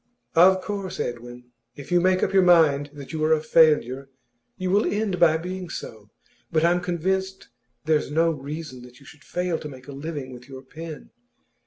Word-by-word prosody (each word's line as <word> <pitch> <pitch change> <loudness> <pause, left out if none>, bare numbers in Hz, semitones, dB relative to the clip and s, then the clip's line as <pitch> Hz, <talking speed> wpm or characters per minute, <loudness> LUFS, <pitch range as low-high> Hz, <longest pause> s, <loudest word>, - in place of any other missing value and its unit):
'Of 185 +3 +6
course, 200 -3 -5
Edwin, 120 +1 -6 0.2
if 140 - -11
you 175 0 +4
make 185 +1 +2
up - - 0
your 195 - +6
mind 160 -5 +4
that 145 0 -10
you 155 -1 -2
are 155 +1 +4
a 155 - +2
failure, 145 -4 +3 0.5
you 185 -1 -2
will 205 +3 +3
end 205 -3 -1
by 160 -2 +5
being 180 +1 -6
so. 110 -7 -8 0.4
But 160 0 +2
I'm 175 +1 +2
convinced 190 +2 -2 0.4
there's 155 -2 +1
no 165 +3 +2
reason 145 -2 -7
that 125 0 -15
you 140 - -18
should 145 - -16
fail 180 -2 -2
to 150 - -7
make 130 -1 -13
a - - -8
living 140 -2 -6
with 125 +2 -13
your 130 -1 -10
pen. 155 - -10
160 Hz, 190 wpm, -24 LUFS, 135-180 Hz, 0.5 s, Of